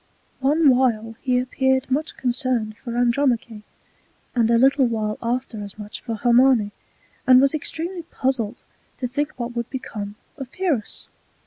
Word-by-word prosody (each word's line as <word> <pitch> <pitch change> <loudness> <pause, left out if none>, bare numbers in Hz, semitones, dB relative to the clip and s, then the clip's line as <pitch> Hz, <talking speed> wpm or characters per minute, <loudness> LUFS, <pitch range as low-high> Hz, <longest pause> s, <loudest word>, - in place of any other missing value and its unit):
One 280 0 +4
while 225 -3 +1
he 255 -2 +1
appeared 260 +1 0
much 300 +5 -1
concerned 245 -4 -1
for 235 0 -6
Andromache; 240 -3 +1 0.7
and 230 -2 +2
a 235 - +5
little 270 +1 +4
while 215 -2 -2
after 235 -2 -2
as 200 0 -9
much 210 -1 -8
for 230 -2 -4
Hermione: 240 -1 +4 0.6
and 255 -1 +8
was 275 +2 +4
extremely 335 +4 -3
puzzled 255 -8 -2 0.3
to 250 - -2
think 290 +4 -2
what 240 0 -5
would 235 0 -3
become 210 -6 -6 0.2
of 265 -3 -7
Pyrrhus. 320 - -2
250 Hz, 145 wpm, -23 LUFS, 230-265 Hz, 0.7 s, and